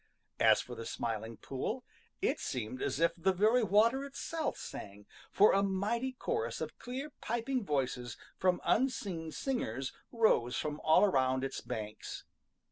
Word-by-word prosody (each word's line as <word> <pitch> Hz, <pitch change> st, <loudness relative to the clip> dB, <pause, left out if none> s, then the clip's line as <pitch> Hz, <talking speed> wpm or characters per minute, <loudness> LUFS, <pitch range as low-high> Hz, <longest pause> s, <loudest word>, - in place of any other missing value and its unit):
As -, -, +6 dB
for -, -, -8 dB
the 115 Hz, -, -6 dB
Smiling 115 Hz, 0 st, -3 dB
Pool, 130 Hz, -1 st, -3 dB, 0.4 s
it -, -, +2 dB
seemed 125 Hz, +1 st, -4 dB
as -, -, -1 dB
if 165 Hz, 0 st, +4 dB
the 180 Hz, +2 st, +2 dB
very 215 Hz, +7 st, +4 dB
water 225 Hz, +6 st, +4 dB
itself 295 Hz, +3 st, -3 dB
sang, 100 Hz, 0 st, -8 dB, 0.2 s
for 205 Hz, -, +6 dB
a 195 Hz, -, +4 dB
mighty 210 Hz, +7 st, 0 dB
chorus 455 Hz, -, -2 dB
of -, -, -5 dB
clear 265 Hz, +5 st, -5 dB
piping 240 Hz, +2 st, -1 dB
voices 130 Hz, -, -1 dB, 0.2 s
from 185 Hz, -1 st, +2 dB
unseen 195 Hz, -10 st, 0 dB
singers 135 Hz, -, -2 dB, 0.2 s
rose 215 Hz, -, +3 dB
from 150 Hz, -1 st, -2 dB
all 160 Hz, +4 st, +6 dB
around 130 Hz, -7 st, +2 dB
its 135 Hz, -, -3 dB
banks. 110 Hz, -3 st, -6 dB
185 Hz, 145 wpm, -33 LUFS, -, 0.4 s, As